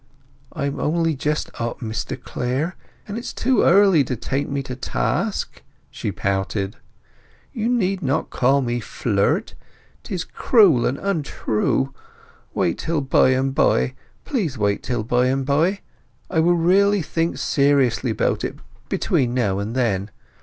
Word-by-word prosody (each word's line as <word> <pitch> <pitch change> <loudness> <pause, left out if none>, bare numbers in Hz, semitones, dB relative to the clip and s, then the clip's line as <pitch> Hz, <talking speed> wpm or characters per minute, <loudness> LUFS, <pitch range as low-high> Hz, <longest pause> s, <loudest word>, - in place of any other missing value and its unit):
"I 140 - -3
am 140 - -3
only 165 +1 +1
just 150 +3 -2
up, 120 0 -3
Mr 110 -2 -4
Clare, 135 +9 -2 0.3
and 205 +1 -5
it - - -1
is 240 - -6
too 255 +1 +2
early 190 -4 +5
to 125 - -2
take 135 +5 -2
me 140 -1 -2
to 125 - -6
task!" - - -2 0.3
she - - -3
pouted. 95 +1 -2 0.8
"You 225 0 -1
need 195 -6 +1
not 140 +1 -1
call 135 +3 +3
me 120 0 -1
Flirt. 105 -2 0 0.5
'Tis 180 -3 -4
cruel 190 - +4
and 130 - -1
untrue. 140 - -1 0.6
Wait 85 - 0
till 160 -2 -1
by 130 -1 +4
and 130 +1 +1
by. 135 -2 +2 0.3
Please 180 - -2
wait 100 -1 0
till 120 -3 -2
by 125 +3 +2
and 135 +1 0
by! 165 +8 +1 0.5
I 170 - +2
will 175 +2 +4
really 195 +3 +3
think 165 +2 -1
seriously 140 -3 +2
about 110 - 0
it - - -3 0.3
between 125 -2 0
now 100 -6 +1
and 105 +4 -4
then. 105 -6 0
140 Hz, 150 wpm, -22 LUFS, 120-170 Hz, 0.8 s, early